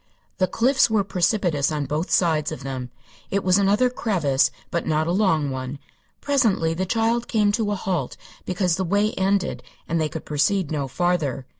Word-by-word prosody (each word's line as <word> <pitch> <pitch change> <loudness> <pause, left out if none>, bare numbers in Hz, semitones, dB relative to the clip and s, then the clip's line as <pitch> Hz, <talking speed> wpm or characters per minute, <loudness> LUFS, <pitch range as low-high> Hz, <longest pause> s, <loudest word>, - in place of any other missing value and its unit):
The 185 - +3
cliffs 255 +6 +3
were 215 -2 +2
precipitous 175 -6 +1
on 150 -2 -2
both 155 +5 -2
sides 160 -4 +2
of 130 - -7
them. 130 -2 -5 0.4
It 200 0 -1
was 185 +1 +4
another 205 +5 +3
crevasse, 175 - +1 0.2
but 170 - -2
not 155 0 +1
a 170 - -1
long 165 -7 +1
one. 130 +1 -5 0.4
Presently 225 - +1
the 185 +3 -2
child 230 +3 0
came 210 -3 +2
to 215 0 -1
a 205 - 0
halt 180 -8 -3 0.3
because 180 -2 0
the 190 - -1
way 205 +4 +1
ended 190 0 0 0.3
and 165 -1 0
they 155 - 0
could 160 - -7
proceed 150 +4 0
no 145 -3 -2
farther. 150 -4 -1
180 Hz, 180 wpm, -23 LUFS, 150-205 Hz, 0.4 s, was